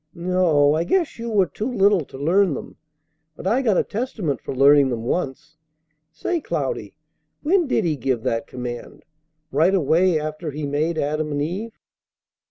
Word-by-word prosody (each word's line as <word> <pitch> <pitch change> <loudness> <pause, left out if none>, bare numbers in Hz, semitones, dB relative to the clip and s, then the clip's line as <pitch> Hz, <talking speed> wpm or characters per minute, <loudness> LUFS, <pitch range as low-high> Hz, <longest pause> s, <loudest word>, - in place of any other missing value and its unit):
No, 170 -5 +3
I 160 +2 +1
guess 340 - 0
you 235 0 -4
were 205 -4 +3
too 210 - -4
little 200 -6 +3
to 130 - -11
learn 170 +3 +2
them. - - -8 0.6
But - - -11
I 230 +7 +2
got 220 -8 +2
a - - +3
Testament 205 - -3
for - - -6
learning 140 +1 +6
them 115 -2 -3
once. 145 +2 -3 0.5
Say, 340 - -2
Cloudy, - - -3 0.5
when 345 +1 +2
did - - +1
He 155 -3 0
give 125 -2 -1
that 115 0 -1
command? 125 -1 -7 0.5
Right 165 +8 +3
away 170 +1 +3
after 155 +1 -4
He 150 +1 -4
made 155 +4 -1
Adam 150 +1 -1
and 145 - -1
Eve?" 205 +9 -5
160 Hz, 170 wpm, -22 LUFS, 145-200 Hz, 0.6 s, learning